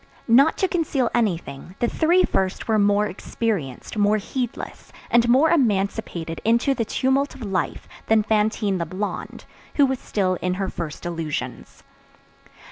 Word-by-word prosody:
Not 270 +7 +5
to 380 - +2
conceal 305 -9 0
anything, 175 -6 -2
the 240 - +1
three 345 +8 +3
first 190 0 -1
were 220 -1 +2
more 205 +1 +3
experienced, 195 - -3
more 205 +1 +4
heedless, 240 +3 -5 0.2
and 235 0 +4
more 275 +6 +5
emancipated 195 - 0
into 235 +4 +3
the 235 -4 -2
tumult 265 +5 0
of 265 - -9
life 195 -3 -2 0.2
than 220 -1 +4
Fantine 210 -2 +1
the 170 - -2
Blonde, 195 +5 -5 0.3
who 285 - +5
was 265 -1 -1
still 185 -3 -1
in 180 0 0
her 190 0 -2
first 155 +1 -6
illusions. 160 -7 -5
215 Hz, 145 wpm, -23 LUFS, 185-250 Hz, 0.3 s, Not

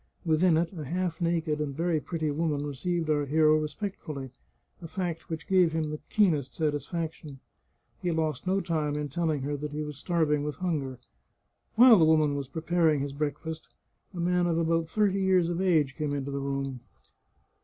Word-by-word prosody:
Within 160 +1 +4
it 170 +3 0
a 160 -4 -6
half 175 +3 -2
naked 165 -3 0
and 140 -2 -3
very 165 -1 +1
pretty 155 -1 -2
woman 150 -1 -1
received 160 +4 -2
our 145 -2 +1
hero 155 +1 +4
respect 155 +7 -4
fully, 140 -5 -6 0.5
a 165 - -7
fact 175 -2 -4
which 160 -1 -5
gave 180 -4 +4
him 155 -2 -1
the 150 - -5
keenest 160 -11 +2
satisfaction. 155 -1 -3 0.6
He 180 - -1
lost 160 -1 -1
no 195 +1 +2
time 155 -4 -1
in 150 -1 -3
telling 155 -1 -1
her 145 +1 -2
that 145 +1 -5
he 150 +1 -2
was 150 -2 -7
starving 155 -3 +1
with 150 0 -3
hunger. 150 -8 -2 0.8
While 235 -3 +8
the 160 - +6
woman 155 -2 +3
was 140 -2 -3
preparing 160 +1 +1
his 140 0 -3
breakfast 155 +2 -4 0.4
a 180 - -8
man 175 +1 +2
of 165 -1 +1
about 165 -1 +1
thirty 200 -2 +1
years 185 -3 +3
of 175 +1 -1
age 155 -7 +2
came 150 -2 -2
into 140 0 -3
the 140 - -2
room. 135 -1 -3
160 Hz, 185 wpm, -28 LUFS, 145-175 Hz, 0.8 s, While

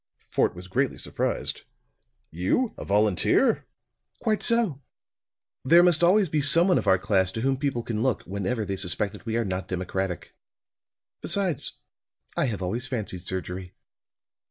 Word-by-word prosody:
Fort - - +1
was 90 +1 -9
greatly 95 - 0
surprised. - - -2 0.7
"You, 95 - 0
a - - -7
volunteer?" 105 -1 +2 0.5
"Quite 215 -1 0
so. 230 - +1 0.8
There 170 +6 +6
must 175 -2 +4
always 190 +3 +5
be 150 -1 0
some 165 +6 +6
one 180 - +4
of - - -6
our 95 -1 +5
class 95 0 +1
to 110 - -3
whom 135 +2 +1
people 130 -3 -2
can 110 -2 -3
look, 130 -4 0
whenever 100 +4 -2
they 95 -1 -3
suspect 100 +2 -1
that 105 - -12
we 115 +1 0
are 115 - 0
not 95 -1 -3
democratic. 95 0 -3 0.9
Besides, 185 -8 -2 0.6
I - - +1
have 105 -7 -3
always 115 +8 -2
fancied 100 -8 -5
surgery." 95 0 -5
110 Hz, 155 wpm, -26 LUFS, 95-145 Hz, 0.9 s, There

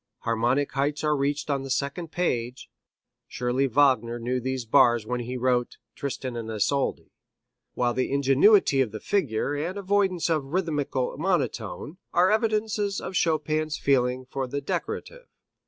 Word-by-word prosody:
Harmonic 120 +5 +1
heights 145 +2 -1
are 150 0 +2
reached 145 +1 -1
on 140 -1 0
the 135 - -7
second 145 +5 -2
page 125 -8 -2 0.6
surely 125 +3 0
Wagner 125 -3 +3
knew 125 +2 -2
these 130 0 -3
bars 120 0 +4
when 125 +2 -2
he 125 +2 -4
wrote 125 -1 0 0.2
"Tristan 130 -2 -4
and 115 -1 -5
Isolde" 110 +6 -1 0.6
while 120 -1 +1
the 130 +1 -1
ingenuity 140 +3 +4
of 120 -5 0
the 110 - -6
figure 145 - 0
and 165 +7 -3
avoidance 195 -3 +1
of 160 -4 +1
a - - -12
rhythmical 145 -6 -1
monotone 175 -2 -2 0.2
are 180 +3 +4
evidences 215 -2 0
of - - -6
Chopin's 155 -2 0
feeling 130 -2 +1
for 130 +1 -4
the 140 +3 -3
decorative. - - -5
140 Hz, 150 wpm, -26 LUFS, 125-165 Hz, 0.6 s, bars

